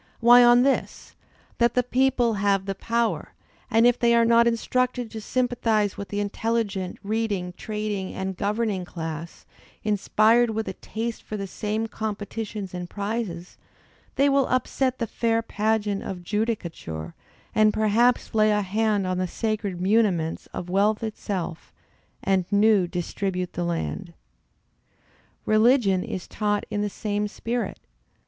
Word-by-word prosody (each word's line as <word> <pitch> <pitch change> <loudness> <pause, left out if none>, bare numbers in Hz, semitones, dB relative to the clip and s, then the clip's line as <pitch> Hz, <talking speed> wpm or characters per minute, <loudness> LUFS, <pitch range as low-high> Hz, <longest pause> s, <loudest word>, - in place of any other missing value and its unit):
Why 240 +1 +8
on 240 0 +6
this, 275 0 -1 0.5
that 235 0 +3
the 250 - +3
people 250 -1 +2
have 200 -1 +2
the 195 - -2
power, 230 +3 -1 0.4
and 225 +1 +4
if 245 0 +4
they 235 -1 +4
are 230 0 +5
not 235 0 +5
instructed 245 +1 0
to 220 - -6
sympathize 225 -4 0
with 200 -1 -6
the 205 - -2
intelligent, 205 -2 -2
reading, 205 -4 -2
trading, 210 -3 -3
and 190 0 -3
governing 210 -1 -1
class, 165 -2 -7 0.4
inspired 215 +3 +3
with 220 0 -2
a - - -3
taste 230 +1 -5
for 215 - -6
the 195 - -4
same 210 +3 -2
competitions 215 -2 -5
and 180 -1 -5
prizes, 200 -4 -4 0.6
they 280 - +4
will 275 -1 +3
upset 255 0 0
the 230 - -1
fair 230 +1 0
pageant 210 -2 0
of 180 -2 -6
Judicature, 175 - -3 0.4
and 215 0 +5
perhaps 220 +4 +2
lay 215 -1 +4
a 210 -1 +2
hand 205 0 +1
on 185 0 -1
the 185 - 0
sacred 210 -2 -2
muniments 185 -5 +1
of 175 - -6
wealth 205 +4 +2
itself, 190 -6 -4 0.5
and 190 -2 +2
new 205 -2 +4
distribute 180 +1 -3
the 175 - -2
land. 170 +1 -3 1.3
Religion 215 -3 +4
is 185 - -5
taught 205 -1 -1
in 205 - -1
the 210 - -1
same 210 +1 -2
spirit. 230 0 -3
215 Hz, 140 wpm, -25 LUFS, 195-230 Hz, 1.3 s, Why